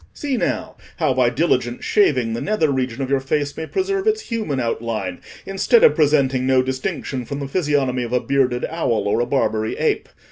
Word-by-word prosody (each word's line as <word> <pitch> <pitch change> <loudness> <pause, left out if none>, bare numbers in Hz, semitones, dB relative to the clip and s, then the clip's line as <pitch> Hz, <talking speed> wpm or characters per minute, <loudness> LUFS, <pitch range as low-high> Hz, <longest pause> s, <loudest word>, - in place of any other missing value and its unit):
See 285 -3 -2
now, - - -2 0.2
how - - +1
by - - +3
diligent - - 0
shaving, 125 - +2
the 115 - -3
nether 180 -8 +1
region 130 -1 -2
of 130 - -4
your 140 - +3
face 145 +2 -2
may 160 - -5
preserve 390 +1 -1
its 435 0 +2
human 220 - -3
outline, 115 -6 -3 0.2
instead 200 - +3
of 475 - +7
presenting 135 -4 +2
no 130 -1 +4
distinction 130 0 -3
from 140 +4 -5
the 140 - -4
physiognomy 140 -5 0
of 120 0 -4
a 125 - +3
bearded 130 -2 0
owl 115 -11 -1
or 105 - +1
a 120 - 0
Barbary 110 -5 0
ape. - - 0
135 Hz, 190 wpm, -21 LUFS, 125-165 Hz, 0.2 s, of